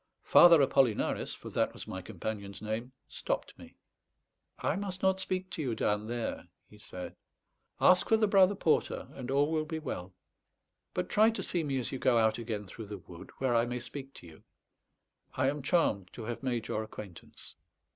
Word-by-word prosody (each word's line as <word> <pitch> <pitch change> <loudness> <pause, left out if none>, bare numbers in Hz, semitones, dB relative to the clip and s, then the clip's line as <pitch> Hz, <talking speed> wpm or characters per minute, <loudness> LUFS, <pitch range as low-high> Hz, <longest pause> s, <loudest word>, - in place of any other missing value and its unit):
Father 170 -2 +8
Apollinaris 130 -5 +1
(for - - -10
that - - 0
was - - -9
my 95 - -6
companion's 100 +1 -5
name) 110 +4 -4 0.2
stopped - - -3
me. - - -13 0.8
"I - - 0
must 190 -1 -5
not 190 0 +3
speak 185 0 -3
to - - -3
you 125 -6 -1
down 105 0 0
there," 120 0 -4 0.2
he 105 - -17
said. 90 -3 -8 0.6
"Ask 185 0 +5
for 225 - +5
the 220 - +3
Brother 195 -1 +5
Porter, 165 -4 0
and 130 -2 -7
all 140 +3 +2
will 155 -1 +1
be 160 +1 -4
well. 95 - -6 0.8
But - - -1
try 215 +2 +5
to 225 - -3
see 175 -2 -1
me 140 -3 -1
as 125 - -2
you 135 - -4
go 125 -2 +3
out 110 0 +3
again 110 -3 -4
through 105 +3 -9
the 105 0 -6
wood, 85 -1 -12
where 130 -2 +1
I 115 0 +3
may 125 +1 -3
speak 135 +3 -8
to - - -12
you. 80 -2 -14 0.9
I 130 0 +2
am 145 0 -5
charmed 110 - +1
to 115 - -7
have 120 +1 -5
made 120 -4 -2
your 110 - -1
acquaintance." 105 -4 -10
125 Hz, 190 wpm, -31 LUFS, 105-160 Hz, 0.9 s, Father